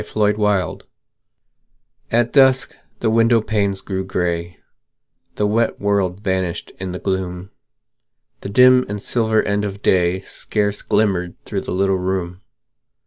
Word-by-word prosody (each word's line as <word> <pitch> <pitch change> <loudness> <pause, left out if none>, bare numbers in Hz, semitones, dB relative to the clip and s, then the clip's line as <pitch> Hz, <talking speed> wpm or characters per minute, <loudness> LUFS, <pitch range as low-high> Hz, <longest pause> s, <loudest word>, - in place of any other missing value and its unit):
FORGIVENESS 105 -4 0 1.3
At 120 +1 +1
dusk 130 -2 +4 0.3
the 110 - +1
window 115 +1 +4
panes 100 -3 -1
grew 95 -1 -3
grey; 85 -2 -2 0.8
The 105 - 0
wet 110 +2 0
world 100 -2 0
vanished 95 -4 -2
in 95 -1 -4
the 90 - -4
gloom; 95 0 -3 0.9
The - - -7
dim 125 +4 +6
and 105 0 -4
silver 110 0 +1
end 100 0 -1
of 100 0 -5
day 90 0 +2
Scarce 105 +1 -2
glimmered 95 -5 0
through - - -3
the - - -6
little 95 0 +1
room. 90 0 -3
100 Hz, 130 wpm, -20 LUFS, 95-110 Hz, 1.3 s, dim